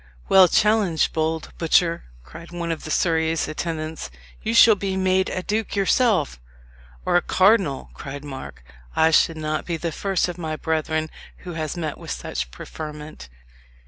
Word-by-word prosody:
"Well 190 -1 +8
challenged, 210 -4 +2
bold 160 0 -2
butcher!" 170 +1 +2 0.2
cried 165 - -12
one 170 -1 -3
of 165 - -4
Surrey's 160 0 +1
attendants. 155 - -4 0.3
"You 115 - -1
shall 225 - +8
be 195 -1 -2
made 190 0 +2
a 185 - -3
duke 215 +2 -2
yourself." 195 - +2 0.7
"Or - - +3
a - - +3
cardinal," 185 -9 +2
cried 140 +1 -8
Mark. 130 - -8 0.3
"I 160 0 +4
should 160 0 +3
not 155 0 -2
be 170 -2 -1
the 165 +1 -3
first 190 +3 0
of 180 0 -6
my 160 -2 -3
brethren 155 0 -1 0.3
who 175 - -5
has 155 0 -4
met 155 -4 -4
with - - -10
such 65 0 -4
preferment." 150 - -9
160 Hz, 155 wpm, -23 LUFS, 155-185 Hz, 0.7 s, Well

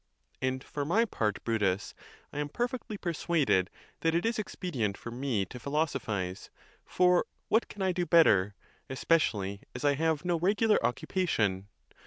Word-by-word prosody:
And 130 0 -1
for 145 - -4
my 205 +11 +3
part, 105 - -2
Brutus, 105 -4 0 0.4
I 145 - -4
am 145 0 -2
perfectly 240 - -3
persuaded 160 - +1 0.3
that 165 0 +1
it 170 - +1
is 230 -1 0
expedient 135 - -2
for 120 - -8
me 120 -5 -1
to 125 - -9
philosophize; 120 - -2 0.3
for 180 -1 +3 0.2
what 225 - +3
can 205 - -6
I 190 - +2
do 175 -1 -1
bet 165 0 +7
ter, 100 +1 +3 0.3
especially 105 -9 +1
as - - -4
I 145 - +5
have 160 +2 0
no 175 -2 +1
regular 210 +5 +3
occupation? 110 - 0
145 Hz, 155 wpm, -30 LUFS, 105-180 Hz, 0.4 s, bet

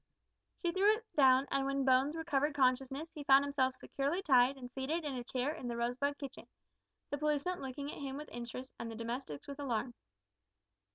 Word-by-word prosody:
She 345 - -1
threw 400 +4 +4
it 450 +1 -10
down, 265 -2 +6
and 275 - +2
when 275 -1 0
Bones 265 +3 +4
recovered 300 -3 0
consciousness 270 +4 +1
he 300 -3 -7
found 275 0 +7
himself 265 -2 +1
securely 285 +9 -2
tied 260 -2 +5
and 250 -2 -7
seated 275 +6 -3
in 290 - -2
a 250 -2 -4
chair 255 +4 -1
in 255 - -6
the 235 -1 -3
Rosebud 255 +5 0
kitchen 275 -2 -8 0.6
the 285 - -2
policeman 300 +4 0
looking 280 +2 -5
at - - -8
him 270 -1 -4
with 300 0 -7
interest, 240 +2 -7
and 230 - -4
the 225 - -6
domestics 230 - -5
with 280 0 -7
alarm. 245 -3 -1
275 Hz, 190 wpm, -34 LUFS, 255-290 Hz, 0.6 s, found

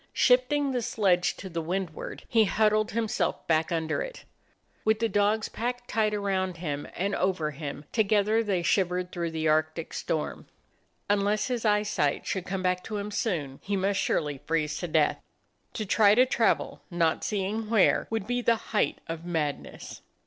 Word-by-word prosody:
Shifting 265 +3 +3
the 250 -2 -1
sledge 190 -6 +1
to 190 - -7
the 170 -2 -3
windward, 175 0 -4
he 225 -2 +4
huddled 215 +1 +2
himself 230 +1 -1
back 160 +1 +1
under 160 -1 -1
it. - - -7 0.6
With 220 0 +3
the 230 +1 +1
dogs 210 +1 +1
packed 245 +2 -4
tight 215 -1 +1
around 190 -3 -1
and 165 +4 -3
over 180 -5 0
him, 145 0 -7
together 215 0 +3
they 190 -5 0
shivered 180 -1 +1
through 170 -2 -2
the 160 -1 -2
Arctic 155 +1 0
storm. 155 - -3 0.6
Unless 205 +2 +1
his 240 -2 -2
eyesight 210 -9 +1
should 190 -2 -3
come 190 0 -3
back 180 0 +1
to 215 - -4
him 205 +1 -4
soon, 160 - -2
he 200 - -2
must 195 +1 +1
surely 145 -3 0
freeze 155 -2 0
to 175 - -3
death. 155 -2 +2 0.5
To 215 - -3
try 205 +1 +5
to 250 +2 +6
travel, 235 -3 +1
not 170 -2 +1
seeing 210 +2 -2
where, 220 -4 +3
would 225 -3 -2
be 245 +2 -1
the 235 -1 +3 0.2
height 210 - +2
of 165 0 -5
madness. 160 -5 -4
195 Hz, 165 wpm, -28 LUFS, 165-220 Hz, 0.6 s, to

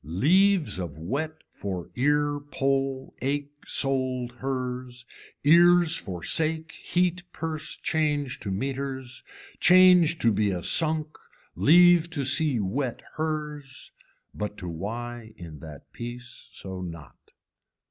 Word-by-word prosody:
Leaves 160 - +2
of 85 -5 -5
wet 150 - -4
for 95 -4 -6
ear 145 +2 +1
pole 135 -2 -2
ache 145 +2 -2 0.2
sold 130 -3 0
hers, 125 -1 -4 0.4
ears 170 +2 +6
for 90 -4 -5
sake 160 0 0
heat 180 +1 0
purse 155 -1 -4
change 145 -4 -1
to 110 - -5
meeters, 130 +3 -4 0.4
change 180 -2 +6
to 115 - +3
be 105 0 +1
a 90 -3 -3
sunk 155 - 0 0.4
leave 175 +1 +6
to 145 -4 -2
see 145 -2 +3
wet 120 +6 -2
hers, 150 -3 -4 0.4
but 105 0 -5
to 90 - -7
why 115 +6 -6
in 80 -4 -10
that 75 -1 -12
peace 120 +1 -9
so 95 -1 -7
not. 85 -7 -10
135 Hz, 115 wpm, -26 LUFS, 115-155 Hz, 0.4 s, ears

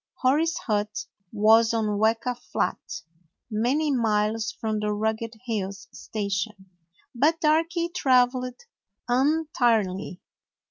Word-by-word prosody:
Hori's 310 +6 +3
hut 210 -1 -2 0.3
was 220 +2 +4
on 210 -2 0
Weka 225 +3 +1
Flat, - - -2 0.7
many 260 +8 +1
miles 220 -1 +1
from 220 -2 -3
the 210 0 -1
Rugged 220 +2 -2
Hills 200 -4 -3
station, 200 -2 -4 0.4
but 300 +7 +2
Darky 330 +2 +2
traveled 255 -5 +1 0.5
untiringly. 240 - +1
225 Hz, 95 wpm, -25 LUFS, 210-255 Hz, 0.7 s, was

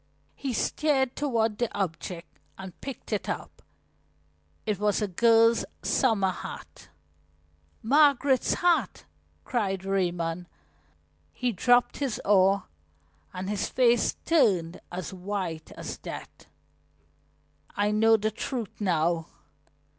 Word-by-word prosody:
He 275 - -4
steered 265 +1 +1
toward 230 -7 0
the 240 -2 0
object 175 -1 -5 0.2
and 190 -2 -10
picked 270 -4 -6
it 205 - -2
up. - - -5 1.0
It 210 -3 -1
was 210 -1 +1
a 210 - 0
girl's 230 +4 +4 0.2
summer 210 -7 +2
hat. - - -9 0.9
"Margaret's 280 0 +4
hat!" 350 -1 +1 0.4
cried 195 -6 -1
Raymond. 175 -3 -1 0.8
He 250 - -1
dropped 245 +5 +3
his 275 -6 -2
oar 195 -1 +4 0.7
and 185 +1 -5
his 205 -1 -2
face 240 -2 +3
turned 200 - +2
as 180 0 -5
white 185 -4 -4
as - - -7
death. - - -9 1.3
"I 205 +1 +2
know 225 +1 +5
the 215 +1 -1
truth 230 -1 -4
now! 170 -3 +1
210 Hz, 110 wpm, -27 LUFS, 185-245 Hz, 1.3 s, know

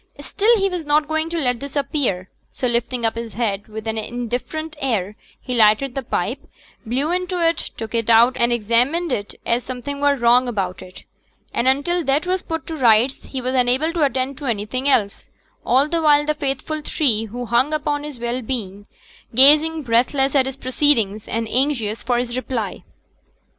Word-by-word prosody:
Still 425 - +2
he 390 -1 +1
was 360 -3 -4
not 295 0 +2
going 315 +1 -1
to 340 - -3
let 250 -6 0
this 280 +2 -8
appear, 275 - -1 0.3
so - - -4
lifting 235 0 -1
up 225 - +1
his 230 -3 -7
head 210 -3 -2
with 220 0 -8
an 220 0 -2
indifferent 245 +8 -4
air 210 -7 -1 0.2
he 255 - -5
lighted 230 +3 +3
the 270 - -3
pipe, 240 +2 -2 0.4
blew 265 +7 -1
into 360 0 -1
it, 330 0 +1 0.2
took 225 0 -6
it 230 -1 -1
out 235 +3 +6
and 235 -2 +2
examined 245 +9 +1
it 205 -4 -3
as 235 +1 0
something 260 +3 -6
were 285 0 +3
wrong 245 0 +4
about 195 -6 -3
it, 185 0 -12 0.5
and 245 - 0
until 310 +7 +1
that 280 +4 +1
was 370 0 -1
put 325 -3 -5
to 325 - -5
rights 245 -1 +3
he 265 - -5
was 255 +1 -2
unable 260 +6 +2
to 340 - -2
attend 265 0 -1
to 290 - -7
anything 235 +5 -1
else; 210 -7 +1 0.4
all 265 +4 +3
the 330 +1 -1
while 295 -1 +4
the 305 - +1
faithful 300 +2 -3
three 230 -9 +1
who 245 +3 -6
hung 240 +5 +2
upon 295 -1 -1
his 295 -3 -8
well 240 +2 -3
being, 205 -4 -5 0.5
gazing, 300 +4 +6
breathless, 260 +3 +1
at 265 -2 +3
his 265 0 -6
proceedings, 235 -6 0
and 225 0 -2
anxious 240 -4 0
for 245 0 0
his 240 0 -2
reply. 255 -4 -4
255 Hz, 190 wpm, -20 LUFS, 230-295 Hz, 0.5 s, out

